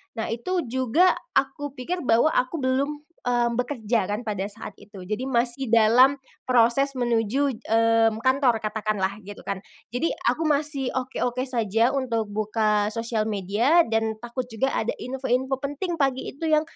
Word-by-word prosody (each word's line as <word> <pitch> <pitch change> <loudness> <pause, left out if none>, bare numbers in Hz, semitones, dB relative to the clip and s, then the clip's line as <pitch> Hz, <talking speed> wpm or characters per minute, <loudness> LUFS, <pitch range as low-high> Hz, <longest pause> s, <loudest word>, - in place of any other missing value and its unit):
nah 225 - -3
itu 345 +10 -2
juga 260 +8 +3 0.3
aku 275 +1 0
pikir 345 +8 -3
bahwa 235 +6 +4
aku 255 +6 0
belum, 275 +3 0 0.3
eee, 240 -1 +2
bekerja 235 -5 0
kan 205 +2 -2
pada 200 -3 -2
saat 205 0 -8
itu 200 -2 -13
jadi 215 +4 -2
masih 250 +1 0
dalam 250 +5 +5 0.2
proses 255 +3 +3
menuju, 245 +2 +1 0.2
mmm, 225 0 +3
kantor 260 -3 +2
katakanlah 210 -2 -2
gitu 205 +1 -9
kan. 200 - -4 0.3
Jadi 250 +7 -1 0.2
aku 325 - -1
masih 290 -3 +1
oke-oke 255 -1 -2
saja 230 -1 +2
untuk 230 -5 -1
buka 210 0 0
sosial 230 -1 -1
media 215 - +2
dan 225 0 0
takut 240 +1 -4
juga 265 +5 0
ada 220 - -1
info-info 260 +1 -1
penting 290 +6 -4
pagi 270 -3 0
itu 305 +5 -6
yang, 310 -1 +4
245 Hz, 150 wpm, -24 LUFS, 220-270 Hz, 0.3 s, dalam